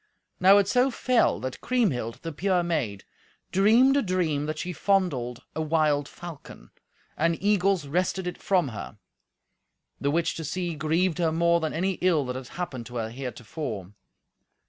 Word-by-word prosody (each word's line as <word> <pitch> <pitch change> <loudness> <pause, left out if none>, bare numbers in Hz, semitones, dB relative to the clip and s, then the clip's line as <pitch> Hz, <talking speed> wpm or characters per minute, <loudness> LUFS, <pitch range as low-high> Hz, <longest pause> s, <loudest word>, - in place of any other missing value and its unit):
Now 195 +2 +7
it 200 -1 +3
so 250 +5 +3
fell 250 -1 +2
that 130 0 -5
Kriemhild, 165 - 0
the 165 - -4
pure 180 +3 +1
maid, 130 - -2 0.5
dreamed 230 +8 +5
a 285 - +3
dream 170 - 0
that 155 0 -3
she 180 +3 -4
fondled 150 - 0
a 160 - -1
wild 155 -2 +1
falcon, 160 - -11 0.4
and 165 +1 +1
eagles 195 -4 +2
wrested 180 +5 -1
it 180 - -5
from 180 -7 +2
her; 105 -1 -8 1.0
the 140 - 0
which 165 +3 +1
to 165 - -4
see 175 +3 -3
grieved 160 +3 0
her 165 -2 +2
more 170 +1 +3
than 160 -2 -2
any 185 +3 -1
ill 170 -6 +3
that 125 0 -4
had 130 -1 -6
happened 140 -10 -5
to 120 - -11
her 110 -1 -3
heretofore. 120 - -6
165 Hz, 165 wpm, -26 LUFS, 140-185 Hz, 1.0 s, Now